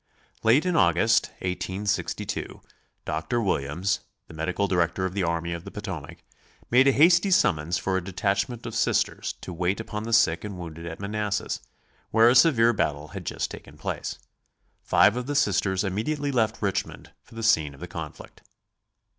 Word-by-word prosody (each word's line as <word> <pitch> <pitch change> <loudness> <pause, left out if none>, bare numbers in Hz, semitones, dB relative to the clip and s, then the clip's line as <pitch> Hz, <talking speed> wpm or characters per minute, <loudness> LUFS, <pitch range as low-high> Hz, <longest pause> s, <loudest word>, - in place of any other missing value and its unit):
Late 120 +9 +4
in 180 -2 +1
August, 95 +6 +4 0.2
1862, 95 +3 -3 0.4
Dr. 80 +10 -1
Williams, 90 -1 0 0.3
the - - -13
medical 90 +5 -1
director 90 0 +1
of 95 - -3
the 100 - -1
army 85 0 -1
of 85 0 -6
the - - -8
Potomac, 95 -8 -7 0.5
made 130 +3 +6
a - - +7
hasty 170 +7 +5
summons 85 - +2
for 95 +3 -1
a 95 - -3
detachment 100 +5 -1
of 115 - -5
Sisters 110 - 0
to 90 - -7
wait 90 +4 -1
upon 105 -1 -5
the 115 - -4
sick 85 -8 +3
and 100 -3 -6
wounded 85 -1 -8
at 80 - -7
Manassas, 105 0 -2 0.5
where 115 +1 +5
a - - +5
severe 120 -4 +5
battle 75 -6 -1
had - - -8
just - - -2
taken - - -11
place. - - -4 0.6
Five - - +4
of 125 0 -4
the 145 - -2
Sisters 100 -5 +2
immediately 140 +10 -1
left 115 -4 0
Richmond 100 -2 -3
for - - -18
the 115 - -5
scene 80 -9 +2
of - - -17
the 90 - -6
conflict. 80 -3 -9
100 Hz, 170 wpm, -26 LUFS, 85-115 Hz, 0.6 s, a